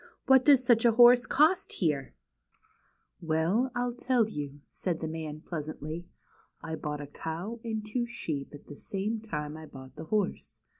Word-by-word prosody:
" - - -46
What 265 -1 +6
does 275 -4 +6
such 235 -2 +4
a 235 -1 +5
horse 240 0 +7
cost 315 +5 +3
here? 150 -7 -1 0.5
" - - -40
"Well, 180 +11 +2
I'll 245 0 -1
tell 245 -2 +1
you," 145 -7 -6
said 175 -4 -2
the 160 - -3
man, 155 -1 -5
pleasantly. 155 +1 -6 0.5
"I 160 - -5
bought 150 -2 -4
a - - -5
cow 165 +10 -6
and 220 -2 -3
two 240 +3 -2
sheep 150 -11 -4
at 145 - -14
the 145 - -10
same 210 +3 -3
time 150 -8 -5
I 160 0 -9
bought 130 0 -12
the 160 - -7
horse. 205 +2 -2
175 Hz, 180 wpm, -29 LUFS, 155-235 Hz, 0.5 s, horse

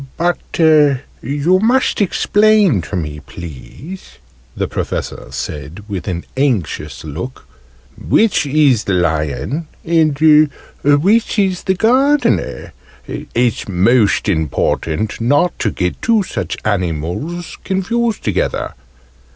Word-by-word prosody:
"But 175 +1 +1 0.2
you 150 +1 +2
must 245 +1 +2
explain 205 - +3
to 90 - -6
me, 75 -4 -4
please," 85 - -10 0.4
the - - -1
Professor - - -4
said 75 +6 -6
with 100 -3 -5
an 85 -2 -3
anxious 95 - -1
look, 80 - -7 0.5
"which 215 -9 +2
is 140 -6 +3
the 100 - 0
Lion, 80 - -1 0.2
and 155 -2 +4 0.3
which 185 +13 +3
is 190 -3 +1
the 190 - +2
Gardener. 265 +8 +1 0.3
It's 120 -3 -2
most 105 +4 +3
important 80 +3 -1
not 145 +9 +2
to 110 - +1
get 90 -3 -3
two 225 -3 +3
such - - -4
animals 95 - -3
confused 225 +4 -1
together. - - -1
140 Hz, 105 wpm, -17 LUFS, -, 0.5 s, and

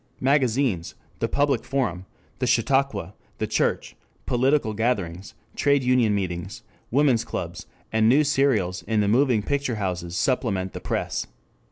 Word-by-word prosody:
Magazines, 130 - +1 0.2
the - - 0
public 145 -1 +1
forum, 100 -10 -2 0.3
the 125 - 0
chautauqua, 120 -5 +1 0.2
the - - -1
church, - - -1 0.3
political 130 -2 +1
gatherings, 100 -5 -2 0.2
trade 140 -2 +2
union 125 -4 +3
meetings, 95 +3 -4 0.3
women's 130 -3 +3
clubs, 115 - -6 0.2
and 110 0 +3
news 145 +4 +4
serials 110 -11 +1
in 110 -1 +2
the 100 - +1
moving 120 -1 +3
picture 140 -2 -1
houses 90 -4 -3
supplement 100 -8 0
the - - -5
press. - - -2
115 Hz, 135 wpm, -24 LUFS, 100-135 Hz, 0.3 s, news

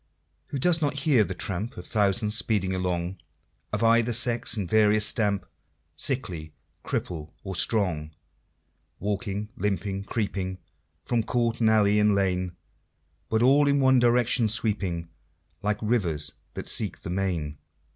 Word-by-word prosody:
Who 140 - -4
does 165 +4 +2
not 145 -1 -1
hear 135 -7 +4
the 95 -2 -5
tramp 95 +5 -4
Of 90 - -8
thousands 105 +1 +1
speeding 100 -4 0
along 90 0 -2 0.5
Of - - -1
either 115 +1 +4
sex 115 0 +2
and 100 -4 -2
various 105 +2 +4
stamp, 105 -3 0 0.5
Sickly, 85 - -1 0.3
cripple, 80 -3 -4
or 95 -1 -5
strong, 90 -8 0 0.9
Walking, 100 +1 -3
limping, 100 0 -2
creeping 95 -4 -3 0.5
From 120 -1 +1
court 115 0 -1
and 110 -2 +3
alley, 105 -1 +4
and 105 -1 +3
lane, 90 -2 0 0.7
But 110 +1 +2
all 140 +3 +5
in 140 0 +3
one 130 -1 +5
direction 120 -1 +3
sweeping 100 -6 -1 0.5
Like 105 0 0
rivers 90 -10 +1 0.2
that - - -6
seek - - +2
the 85 - -6
main? 85 -6 -2
105 Hz, 135 wpm, -26 LUFS, 95-115 Hz, 0.9 s, all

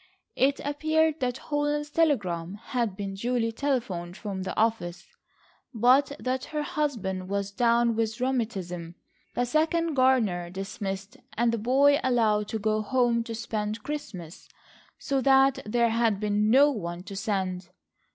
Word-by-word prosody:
It 275 +2 +2
appeared 315 +2 +1
that 250 -2 -1
Holland's 295 0 -2
telegram 200 - 0
had 230 -1 -2
been 200 -1 -4
duly 230 +3 -1
telephoned 220 -9 -2
from 195 -3 -5
the 185 -1 -5
office, 215 -6 0 0.7
but 255 +5 +4
that 255 0 -2
her 300 -1 -3
husband 210 -12 -2
was 200 0 -2
down 235 +1 +2
with 225 +1 -1
rheumatism, 195 -10 -2 0.4
the 245 - +1
second 320 +4 +1
gardener 235 -10 +2
dismissed, 195 +1 -5 0.2
and 235 0 +3
the 230 - -1
"boy" 275 +5 +4
allowed 220 -5 +2
to 220 - -3
go 215 0 0
home 240 0 +1
to 230 - -5
spend 215 -1 -3
Christmas, 190 - -7 0.5
so 275 -1 -1
that 270 0 +4
there 235 +1 +2
had 225 -3 +1
been 210 0 +1
no 280 +5 +6
one 175 -7 -5
to 195 - -8
send. 190 -3 -2
230 Hz, 140 wpm, -27 LUFS, 200-265 Hz, 0.7 s, no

